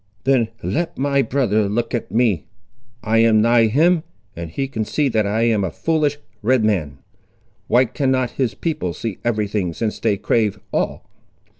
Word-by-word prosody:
"Then 130 -4 +3 0.2
let 155 - -2
my 140 0 +2
brother 110 -7 +1
look 115 +4 -2
at 120 - -2
me. 110 -4 +1 0.6
I 110 +1 +2
am 115 -1 +5
nigh 115 +1 +4
him, 160 +9 +3 0.3
and 85 -1 -6
he 135 +12 -3
can 115 -5 -3
see 140 +6 0
that 110 -4 +1
I 110 +3 0
am 110 -4 +2
a 95 - -1
foolish 150 - 0 0.2
Red 120 0 +2
man. 80 -10 0 0.7
Why 125 +3 +4
cannot 130 0 0
his 130 -4 -1
people 155 - -2
see 110 -5 -5
every 110 -3 0
thing, 100 -4 -2
since 110 +4 -3
they 105 -3 +1
crave 105 -1 0
all?" - - -2
115 Hz, 170 wpm, -20 LUFS, 105-135 Hz, 0.7 s, am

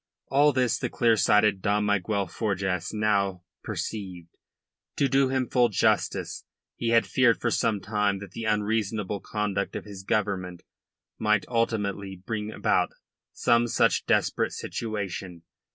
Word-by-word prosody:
All 145 +3 +5
this 125 -3 +1
the - - -2
clear 115 -2 +3
sighted 105 0 +3
Dom 105 +1 +1
Miguel 105 0 0
Forjas 95 -5 -2
now 100 -4 0 0.2
perceived. 90 -6 -5 0.7
To 140 - +2
do 135 -1 +3
him 130 -1 0
full 120 -1 +3
justice, 100 - 0 0.3
he 115 - -2
had 115 0 +4
feared 120 -3 +3
for 115 - 0
some 110 -2 +1
time 105 0 0
that 100 -2 -9
the 115 +3 -6
unreasonable 105 -1 -1
conduct 100 -2 -2
of - - -5
his 100 -2 -9
Government 95 -3 -2 0.6
might 105 -2 +2
ultimately 105 -5 -1
bring 105 +3 -5
about - - +1 0.4
some 120 0 +2
such - - +2
desperate - - +1
situation. 95 -6 -5
105 Hz, 135 wpm, -26 LUFS, 95-115 Hz, 0.7 s, All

